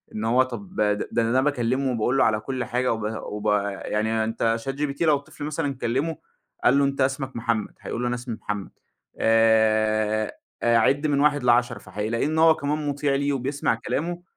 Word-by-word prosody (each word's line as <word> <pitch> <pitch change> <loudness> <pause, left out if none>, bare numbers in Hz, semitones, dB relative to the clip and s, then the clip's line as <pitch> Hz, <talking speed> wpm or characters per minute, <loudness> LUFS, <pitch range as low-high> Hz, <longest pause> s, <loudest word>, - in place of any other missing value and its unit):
إن 110 - -3
هو 125 +3 +4
طَب 185 +10 -8
د 105 - +2
ده - - -4
ده 115 - +1
أنا 115 0 0
ده 130 - +3
باكلمه، 130 -1 0
باقول 120 +4 +1
له - - +5
على 110 -1 +2
كُلّ 130 +3 -3
حاجة، 125 +1 0
وب 110 - -5 0.2
وب 105 0 -6 0.4
يعني 110 +1 0
أنت 115 +1 0
Chat - - +1
GPT 140 0 -2
لو 155 -3 +4
الطفل 140 +1 -8
مثلًا 145 -2 -2
كلمه 135 +7 -1 0.5
قال 135 +3 +5
له 140 - +4
أنت 140 0 -1
اسمك 135 0 -1
محمد. 115 -2 -1
هيقول 115 - -4
له 125 - 0
أنا 120 - 0
اسمي 120 -1 -5
محمد. 105 -2 -4 0.5
آآ، 110 -1 +3 0.3
عد 120 +6 +3
من 145 -2 +1
1 145 -2 +2
ل10 120 0 +2
فحيلاقيه 110 +4 -3
إن 155 +2 -1
هو 160 0 +6
كمان 150 0 -2
مُطيع 145 0 0
ليه 140 +1 0
وبيسمع 135 -1 -1
كلامه. 155 +10 -3
125 Hz, 195 wpm, -24 LUFS, 115-140 Hz, 0.5 s, هو